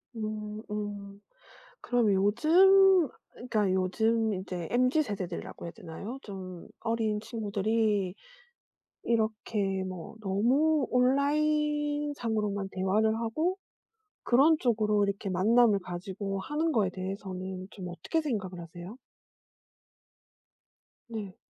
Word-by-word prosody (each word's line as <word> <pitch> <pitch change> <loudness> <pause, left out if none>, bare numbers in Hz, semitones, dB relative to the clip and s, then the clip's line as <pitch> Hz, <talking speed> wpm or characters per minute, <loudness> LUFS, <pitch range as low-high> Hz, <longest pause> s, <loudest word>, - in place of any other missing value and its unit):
음 215 -1 -4
음. 205 -1 -5 0.6
그럼 240 -4 +2
요즘 350 - +5 0.3
그러니까 215 -6 0
요즘 220 +4 +1
인제 185 -3 -5
MZ세대들이라고 245 - -1
해야 170 - -6
되나요? 195 +9 -8
좀 185 -3 -8
어린 225 -2 0
친구들이 215 -3 0 0.9
이렇게 215 -4 0
뭐 185 +1 -7
너무 255 +9 +2
온라인상으로만 285 -6 +1
대화를 205 +4 +1
하고 310 - -1 0.6
그런 280 +6 +5
쪽으로 215 -4 +2
이렇게 200 0 -2
만남을 210 +3 +4
가지고 190 +2 -5
하는 305 +9 -1
거에 205 -8 +2
대해서는 185 0 -5
좀 185 -4 -7
어떻게 175 - -2
생각을 195 - -3
하세요? 175 +5 -9 2.1
네. 210 -5 -6
215 Hz, 235 characters per minute, -29 LUFS, 190-245 Hz, 2.1 s, 요즘